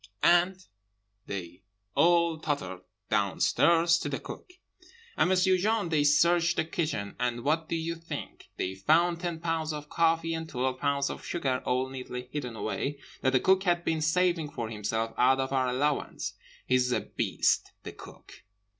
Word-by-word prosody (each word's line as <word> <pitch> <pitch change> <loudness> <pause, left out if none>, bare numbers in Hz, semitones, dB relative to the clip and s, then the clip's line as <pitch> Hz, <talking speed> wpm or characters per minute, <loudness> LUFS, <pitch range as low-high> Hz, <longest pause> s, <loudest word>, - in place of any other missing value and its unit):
'—And 180 +2 +3 0.6
they 90 -2 -6 0.3
all 170 +1 +3
tottered 95 - -3 0.3
downstairs 170 0 +3
to - - -3
The - - -3
Cook; 360 - -10 0.6
and - - +2
M'sieu 185 0 +3
Jean, 215 -1 +1
they 155 -3 +2
searched 170 +4 +4
the - - 0
kitchen; 155 - -3
and 120 -1 -1
what 160 +2 0
do - - 0
you 165 +1 -2
think? 165 0 -8
They 95 - -2
found 165 - +2
ten 170 -2 -3
pounds 165 -1 -1
of 150 -1 -7
coffee 165 0 +1
and 160 0 -4
twelve 130 0 -2
pounds 140 -1 0
of - - -8
sugar 130 -7 -1
all 130 +1 +1
neatly 125 -1 -7
hidden 125 -6 -4
away, 140 +6 -3 0.2
that 130 0 +1
The 130 - +5
Cook 190 +5 +3
had 175 -1 +1
been 160 -1 0
saving 165 0 +1
for 115 -5 -5
himself 110 +1 -2
out 130 +2 +4
of 135 0 -2
our 130 -1 +2
allowance. 140 +3 -1 0.3
He's 125 -1 +2
a - - +1
beast, - - 0
the - - -6
Cook!" - - -14
155 Hz, 165 wpm, -29 LUFS, 130-170 Hz, 0.6 s, The